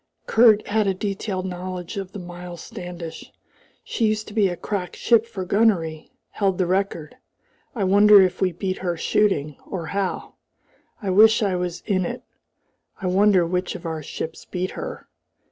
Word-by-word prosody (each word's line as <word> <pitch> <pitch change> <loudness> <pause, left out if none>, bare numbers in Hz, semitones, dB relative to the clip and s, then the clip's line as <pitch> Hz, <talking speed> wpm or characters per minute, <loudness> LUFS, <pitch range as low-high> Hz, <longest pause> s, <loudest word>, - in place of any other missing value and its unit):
Kurt 220 -2 +5
had 215 0 +1
a 195 - +1
detailed 195 -1 -3
knowledge 180 -1 -5
of 195 -2 -5
the - - -8
Miles 175 -2 -8
Standish. 175 -2 -8 0.5
"She 225 - 0
used 215 0 -1
to - - -11
be 210 -3 +3
a 175 -1 -4
crack 190 -5 -4
ship 230 -1 +3
for 190 -5 -5
gunnery 180 -6 +1 0.2
held 195 -3 0
the 185 - +1
record. 180 -4 -2 0.6
I 210 - -1
wonder 205 +2 +7
if 185 -1 +2
we 185 -1 +2
beat 185 +2 -3
her 175 -2 -2
shooting, 155 -7 +1
or 175 -4 -5
how? 195 +3 -3 0.7
I 195 - 0
wish 220 +3 +6
I 195 -3 +1
was 180 -1 -3
in 190 -4 +1
it. - - -6 0.8
I - - -6
wonder 190 0 +4
which 180 +2 -2
of 170 - -9
our 160 -1 -3
ships 160 +2 -6
beat 185 0 -4
her. - - -7
185 Hz, 170 wpm, -23 LUFS, 175-205 Hz, 0.8 s, wonder